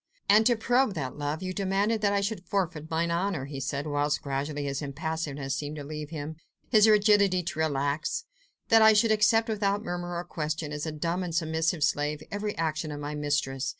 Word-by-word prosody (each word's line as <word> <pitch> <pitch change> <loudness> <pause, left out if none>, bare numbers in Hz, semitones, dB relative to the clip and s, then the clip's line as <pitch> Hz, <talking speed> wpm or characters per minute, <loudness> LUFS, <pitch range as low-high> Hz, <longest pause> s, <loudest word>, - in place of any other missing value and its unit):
"And 215 +2 +6
to 240 - +4
probe 245 0 +2
that 130 -5 -4
love, 145 +4 -2
you 185 0 -3
demanded 200 +3 0
that 205 -1 +3
I 200 0 +1
should 200 -3 -3
forfeit 165 -6 -2
mine 165 +1 0
honour," 170 -4 -1
he 140 -1 -6
said, 140 +2 -3
whilst 145 0 0
gradually 145 +1 -3
his 140 0 -2
impassiveness 145 -1 -3
seemed 145 +1 -4
to 150 - -6
leave 150 0 -6
him, 155 -1 -6 0.3
his 215 -2 +6
rigidity 205 -3 +4
to 165 -2 -5
relax; 155 - -1 0.4
"that 225 -1 +7
I 220 0 +8
should 220 +1 +4
accept 220 +1 +4
without 205 -1 0
murmur 175 -1 -4
or 175 - -3
question, 155 -2 -3
as 150 +2 -4
a - - -2
dumb 165 +4 -2
and 175 -3 -4
submissive 160 0 0
slave, 150 +1 0
every 205 +1 -3
action 155 -1 -1
of 145 - -5
my 145 +1 -4
mistress. 145 -3 -1
160 Hz, 200 wpm, -28 LUFS, 145-200 Hz, 0.4 s, I